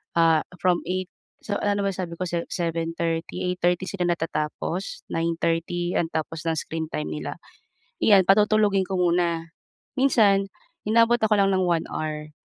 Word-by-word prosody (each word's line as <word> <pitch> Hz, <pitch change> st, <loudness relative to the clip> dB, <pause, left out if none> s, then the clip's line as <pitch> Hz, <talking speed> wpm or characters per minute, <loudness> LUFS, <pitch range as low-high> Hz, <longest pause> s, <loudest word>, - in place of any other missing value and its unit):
ah, 165 Hz, -2 st, +4 dB, 0.2 s
from 180 Hz, -1 st, +2 dB
8:00 185 Hz, 0 st, -2 dB, 0.4 s
so, 205 Hz, -, -1 dB
ano 205 Hz, 0 st, +1 dB
na -, -, -1 dB
ba 195 Hz, -, 0 dB
sabi 180 Hz, -2 st, -5 dB
ko 185 Hz, -, -2 dB
se 170 Hz, -1 st, -2 dB
7:30, 165 Hz, -1 st, -2 dB
8:30 180 Hz, 0 st, 0 dB
sila 185 Hz, -3 st, -2 dB
natatapos, 165 Hz, +2 st, -3 dB
9:30 170 Hz, +1 st, -1 dB
ang 165 Hz, -, 0 dB
tapos 160 Hz, 0 st, -3 dB
ng 165 Hz, -, +1 dB
screen 160 Hz, +1 st, -3 dB
time 75 Hz, +1 st, -2 dB
nila. 75 Hz, -1 st, -5 dB, 0.7 s
Iyan 200 Hz, -3 st, +6 dB
patutulugin 210 Hz, -1 st, +4 dB
ko 195 Hz, -, -4 dB
muna, 170 Hz, -2 st, +1 dB, 0.5 s
minsan 210 Hz, -7 st, +4 dB, 0.4 s
inabot 230 Hz, +2 st, +4 dB
ako 220 Hz, -2 st, +2 dB
lang 195 Hz, 0 st, +4 dB
ng 185 Hz, -, +2 dB
1 170 Hz, -2 st, +1 dB
hour, 155 Hz, -1 st, -4 dB
175 Hz, 155 wpm, -24 LUFS, 165-195 Hz, 0.7 s, Iyan